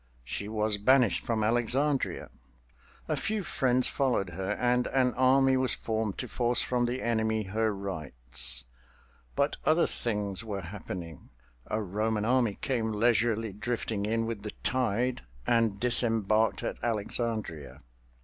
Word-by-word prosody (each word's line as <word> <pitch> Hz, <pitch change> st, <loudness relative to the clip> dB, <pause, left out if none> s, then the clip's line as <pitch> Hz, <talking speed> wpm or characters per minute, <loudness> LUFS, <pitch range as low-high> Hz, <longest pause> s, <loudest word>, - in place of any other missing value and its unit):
She 85 Hz, +11 st, -4 dB
was 105 Hz, -1 st, 0 dB
banished 125 Hz, -3 st, +3 dB
from 110 Hz, -2 st, -1 dB
Alexandria. 125 Hz, +5 st, 0 dB, 0.8 s
A -, -, 0 dB
few 215 Hz, -1 st, -2 dB
friends 130 Hz, -5 st, +1 dB
followed 120 Hz, -9 st, 0 dB
her, 95 Hz, +2 st, -2 dB
and 125 Hz, 0 st, +1 dB
an 130 Hz, -2 st, +2 dB
army 130 Hz, +1 st, +4 dB
was 130 Hz, -1 st, +1 dB
formed 110 Hz, -3 st, -2 dB
to 125 Hz, -, -4 dB
force 120 Hz, 0 st, 0 dB
from 125 Hz, -1 st, +1 dB
the 125 Hz, +2 st, -3 dB
enemy 110 Hz, -2 st, 0 dB
her 110 Hz, +3 st, 0 dB
rights. 65 Hz, -11 st, -1 dB, 0.7 s
But 140 Hz, +1 st, +1 dB
other 160 Hz, +2 st, +4 dB
things 105 Hz, -3 st, -2 dB
were 100 Hz, -3 st, -4 dB
happening—a 80 Hz, -, -7 dB
Roman 105 Hz, +2 st, -1 dB
army 120 Hz, -4 st, +2 dB
came 115 Hz, -4 st, -1 dB
leisurely 115 Hz, -1 st, +1 dB
drifting 110 Hz, -1 st, -2 dB
in 115 Hz, +1 st, 0 dB
with 115 Hz, -3 st, -4 dB
the 105 Hz, 0 st, -6 dB
tide 125 Hz, 0 st, 0 dB, 0.2 s
and 115 Hz, -4 st, +2 dB
disembarked 110 Hz, -2 st, +4 dB
at -, -, -3 dB
Alexandria. 110 Hz, -, -3 dB
110 Hz, 130 wpm, -29 LUFS, 100-125 Hz, 0.8 s, army